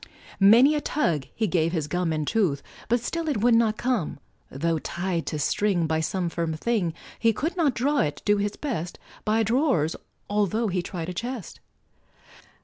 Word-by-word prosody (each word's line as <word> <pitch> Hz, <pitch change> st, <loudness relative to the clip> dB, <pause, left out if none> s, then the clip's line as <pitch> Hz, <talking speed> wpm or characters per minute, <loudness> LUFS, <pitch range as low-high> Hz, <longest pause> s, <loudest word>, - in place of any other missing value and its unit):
Many 230 Hz, +9 st, +7 dB
a 300 Hz, -, 0 dB
tug 165 Hz, -, 0 dB
he 225 Hz, -, 0 dB
gave 165 Hz, -3 st, +1 dB
his 160 Hz, -4 st, 0 dB
gum 175 Hz, +2 st, -1 dB
And 155 Hz, -1 st, -1 dB
tooth, 180 Hz, -8 st, +1 dB, 0.3 s
but 240 Hz, 0 st, +2 dB
still 330 Hz, +6 st, -2 dB
it 290 Hz, -, 0 dB
would 240 Hz, +1 st, +4 dB
not 225 Hz, -1 st, +3 dB
come, 245 Hz, -10 st, -1 dB, 0.3 s
Tho' 160 Hz, +4 st, -1 dB
tied 175 Hz, +1 st, -3 dB
to 155 Hz, -, -2 dB
string 175 Hz, +4 st, +1 dB
by 160 Hz, 0 st, 0 dB
some 175 Hz, +3 st, -1 dB
firm 165 Hz, -1 st, -2 dB
thing, 180 Hz, -3 st, -1 dB, 0.2 s
He 230 Hz, -1 st, +3 dB
could 325 Hz, -, -2 dB
not 310 Hz, -8 st, +2 dB
draw 285 Hz, +4 st, +1 dB
it, 150 Hz, -1 st, -1 dB
do 205 Hz, 0 st, +4 dB
his 205 Hz, 0 st, -1 dB
best, 200 Hz, -, -4 dB, 0.3 s
By 220 Hz, +1 st, +2 dB
draw'rs, 225 Hz, -, +1 dB, 0.3 s
altho' 210 Hz, +2 st, +1 dB
he 180 Hz, -1 st, 0 dB
tried 175 Hz, -1 st, -5 dB
a -, -, -4 dB
chest. 235 Hz, 0 st, -5 dB
200 Hz, 180 wpm, -25 LUFS, 165-235 Hz, 0.3 s, Many